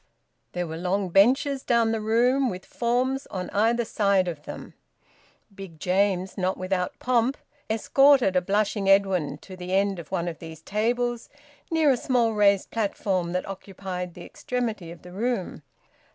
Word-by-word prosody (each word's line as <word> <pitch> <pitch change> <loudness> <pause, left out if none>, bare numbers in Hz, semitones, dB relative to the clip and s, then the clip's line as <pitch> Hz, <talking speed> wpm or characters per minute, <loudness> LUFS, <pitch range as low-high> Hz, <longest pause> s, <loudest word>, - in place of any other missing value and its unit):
There 180 0 -2
were 160 -1 -6
long 185 +2 -1
benches 260 +9 +3
down 235 -3 +2
the 225 -1 -1
room, 245 +5 +2
with 185 -2 -7
forms 255 +3 -1
on 185 -1 -5
either 230 +3 +2
side 200 -4 +2
of 155 -4 -6
them. - - -8 0.8
Big 190 -5 -10
James, 190 +2 0
not 185 +1 0
without 185 -1 -2
pomp, 250 +2 +1 0.3
escorted 255 -1 +4
a 180 - +4
blushing 200 +1 0
Edwin 195 -7 +3
to 190 - -10
the 180 0 -6
end 195 -1 +1
of 165 - -10
one 175 -2 -1
of 165 -2 -5
these 160 -1 -10
tables, 240 +3 -1 0.4
near 320 -3 +3
a 255 - +2
small 240 -2 +1
raised 200 -2 +3
platform 195 -5 -1
that 180 - -2
occupied 190 -2 -6
the 175 - -9
extremity 225 -8 -4
of 170 - -11
the 180 - -11
room. 210 -3 -2
200 Hz, 160 wpm, -25 LUFS, 180-235 Hz, 0.8 s, escorted